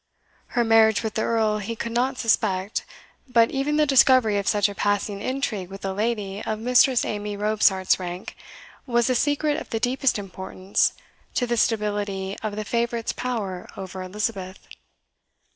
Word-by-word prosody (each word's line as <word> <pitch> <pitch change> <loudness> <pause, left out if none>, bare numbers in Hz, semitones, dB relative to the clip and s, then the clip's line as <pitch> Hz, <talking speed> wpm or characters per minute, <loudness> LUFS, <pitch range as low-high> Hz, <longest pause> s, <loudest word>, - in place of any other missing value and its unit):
Her 240 - +5
marriage 225 -1 +4
with 220 - -3
the 220 - -1
Earl 220 -2 +1
he 220 +3 -4
could 230 +1 -4
not 255 +3 0
suspect; 200 -4 0 0.4
but 230 -2 +4
even 280 +2 0
the 305 - +4
discovery 255 -6 +5
of 200 - -4
such 205 -1 +3
a 205 - -6
passing 205 0 -1
intrigue 220 -8 -2
with 195 0 -8
a 190 - -2
lady 210 -1 -2
of 215 - -2
Mistress 250 +2 +4
Amy 205 0 -4
Robsart's 205 -3 +2
rank 180 0 -6 0.5
was 240 0 +2
a - - +3
secret 290 +3 +1
of - - -10
the 225 - -2
deepest 255 +2 +1
importance 190 -1 -1 0.4
to 245 - +1
the 240 0 -1
stability 205 -3 -1
of 215 -2 -3
the 215 0 -4
favourite's 235 0 -1
power 210 -8 -4
over 190 -1 -6
Elizabeth. 190 -1 -4
215 Hz, 160 wpm, -24 LUFS, 200-235 Hz, 0.5 s, Her